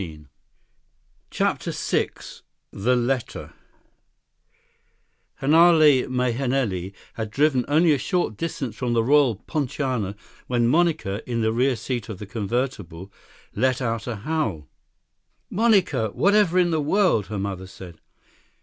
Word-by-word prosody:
33 80 -4 -8 1.0
CHAPTER - - -1
VI - - -1 0.6
The 120 +6 +1
Letter 125 0 -2 1.9
Hanale 155 -2 +5
Mahenili 125 -6 -1 0.2
had 110 -2 -5
driven 135 +1 +2
only 160 +3 +4
a 140 - 0
short 160 - -1
distance 135 -5 -4
from 120 -1 -2
the 115 -1 +2
Royal 135 -2 +4
Poinciana 130 - -2 0.3
when 120 -2 +1
Monica, 150 - +1
in 115 -1 -1
the 110 0 +1
rear 130 +2 +2
seat 120 -1 -4
of 110 - -6
the 105 - -8
convertible, 100 -4 -4 0.4
let 130 +3 +1
out 115 -3 -3
a 120 - -3
howl. 110 - -3 0.8
"Monica! 190 - +2
Whatever 200 - +2
in 175 -1 +3
the 160 -2 +1
world!" 165 - +2
her 105 - -5
mother 95 -1 -4
said. 90 -3 -12
125 Hz, 120 wpm, -23 LUFS, 105-150 Hz, 1.9 s, Hanale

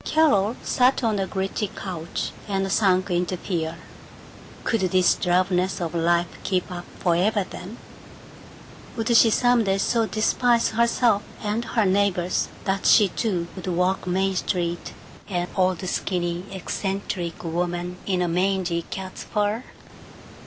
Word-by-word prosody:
Carol 240 -9 +3
sat 255 +1 +2
on 220 -3 +1
the 195 -1 -1
gritty 195 +3 -2
couch, 175 -4 -5 0.2
and 195 -1 -1
sank 185 -2 +2
into 180 +1 0
fear. 165 -3 -3 0.9
Could 225 -3 0
this 185 -1 +4
drabness 180 +1 +1
of 170 -2 -3
life 170 +1 +1
keep 185 -2 -1
up 175 -1 -6
forever, 190 +4 +2
then? 195 +7 -9 1.2
Would 230 +1 +1
she 230 - +7
some 245 +1 +3
day 195 -1 +1
so 225 +3 +1
despise 235 +2 +2
herself 235 -1 +2 0.2
and 215 +3 -1
her 225 -3 +1
neighbors 185 -2 +1 0.2
that 195 0 0
she 205 -3 +6
too 180 -4 -1
would 185 -1 -7
walk 185 +1 0
Main 190 +1 +1
Street 175 -2 -2 0.4
an 175 -2 -1
old 185 -1 +1
skinny 175 -1 -2
eccentric 190 -2 -4
woman 175 +1 -2
in 185 -2 +1
a - - 0
mangy 180 -1 0
cat's 190 -1 -6
fur? 210 +2 -1
190 Hz, 135 wpm, -24 LUFS, 180-210 Hz, 1.2 s, she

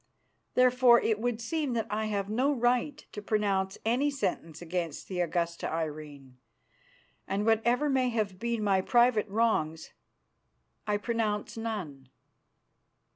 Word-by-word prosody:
Therefore 250 -1 +6
it 215 -2 0
would 240 -1 -1
seem 285 +3 -2
that 225 -2 -1
I 215 +1 -1
have 200 -2 -2
no 250 +7 +1
right 250 +2 +1
to 210 - -7
pronounce 200 -2 0
any 250 +6 +2
sentence 165 - -3
against 170 -2 -4
the 185 -2 -4
Augusta 170 -1 -1
Irene, 150 -5 -6 0.9
and 200 +2 -1
whatever 235 +6 +2
may 260 -3 +2
have 210 -5 -2
been 235 -1 -2
my 195 -2 +3
private 240 0 +3
wrongs, 195 -7 0 1.0
I 210 0 +1
pronounce 215 -2 -2
none. 185 - -5
215 Hz, 130 wpm, -29 LUFS, 185-240 Hz, 1.0 s, Therefore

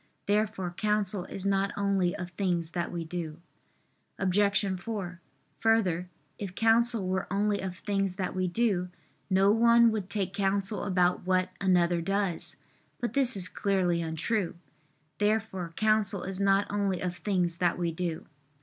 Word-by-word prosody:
Therefore 205 -3 0
counsel 205 -1 -1
is 195 - -7
not 195 0 +2
only 195 -2 +1
of 180 -1 -6
things 175 -4 -1
that 170 -1 -2
we 170 -1 -4
do. 160 -1 -5 0.8
Obj. 195 0 +1
4: 185 -5 -5 0.4
Further, 185 -6 +2 0.3
if 195 -3 -5
counsel 225 -2 +3
were 190 0 -2
only 205 +1 +1
of 185 -1 -5
things 195 -2 -1
that 185 -2 -2
we 185 0 0
do, 180 -2 +1 0.4
no 195 +1 +4
one 235 +1 +6
would 205 -3 -3
take 200 -2 -2
counsel 200 0 0
about 180 -2 +1
what 185 0 +2
another 175 -2 +3
does. 195 -1 -1 0.4
But 240 - -2
this 260 -5 +1
is 180 -2 -1
clearly 185 -5 +1
untrue. 165 +4 -1 0.6
Therefore 210 -5 0
counsel 215 -3 +1
is 190 0 -5
not 195 0 +3
only 200 -3 0
of 180 -1 -3
things 180 -4 0
that 175 -1 +1
we 170 -1 0
do. 165 -1 -3
195 Hz, 150 wpm, -29 LUFS, 180-205 Hz, 0.8 s, one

